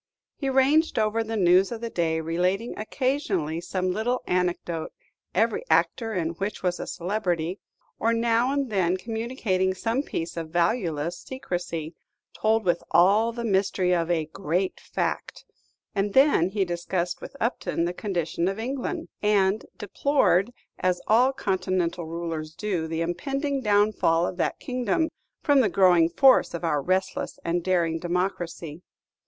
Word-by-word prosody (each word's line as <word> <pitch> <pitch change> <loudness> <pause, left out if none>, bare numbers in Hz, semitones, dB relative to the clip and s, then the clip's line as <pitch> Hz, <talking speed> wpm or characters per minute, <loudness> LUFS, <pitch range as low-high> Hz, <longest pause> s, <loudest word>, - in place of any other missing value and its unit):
He 275 - -2
ranged 270 +4 +3
over 220 +1 +1
the 225 0 -3
news 185 +1 +4
of 235 - -4
the 230 0 -5
day, 165 -3 0
relating 180 +7 -1
occasionally 215 - -1
some 185 +1 -1
little 240 +6 -1
anecdote, 175 -2 -1 0.4
every 225 - +2
actor 225 -3 +2
in 165 -3 0
which 195 +5 -4
was 180 -1 0
a - - -5
celebrity; 180 -2 -2 0.4
or 230 - +2
now 230 +2 +2
and 280 -4 -1
then 185 -2 +1
communicating 220 -4 -1
some 230 +7 0
piece 170 - -5
of 165 -1 -4
valueless 170 -2 0
secrecy, 175 -10 -4 0.4
told 220 0 +1
with 175 - +2
all 210 +6 +4
the 235 0 -5
mystery 190 -3 +1
of 170 -1 0
a 165 -3 +1
"great 180 +3 -2
fact;" - - -3 0.5
and 200 0 -1
then 265 - +5
he 195 0 0
discussed 175 0 -2
with - - -9
Upton 225 -7 -1
the 175 - -2
condition 175 -4 -2
of 195 +1 -1
England, 270 +8 -3
and 205 0 +2
deplored, 210 -2 +2 0.3
as 185 -1 +1
all 245 +5 +4
Continental 185 -7 -1
rulers 165 -2 -5
do, 185 -7 -2
the 160 0 -2
impending 275 - -2
downfall 205 -6 +3
of 180 - -4
that - - 0
kingdom, 255 - 0 0.3
from 285 -2 +4
the 230 -6 +3
growing 175 -2 +5
force 265 -3 +4
of 170 - -6
our 150 -4 +1
restless 185 +4 -1
and 170 +1 0
daring 170 -3 +1
democracy. 175 -2 -3
190 Hz, 150 wpm, -26 LUFS, 170-225 Hz, 0.5 s, then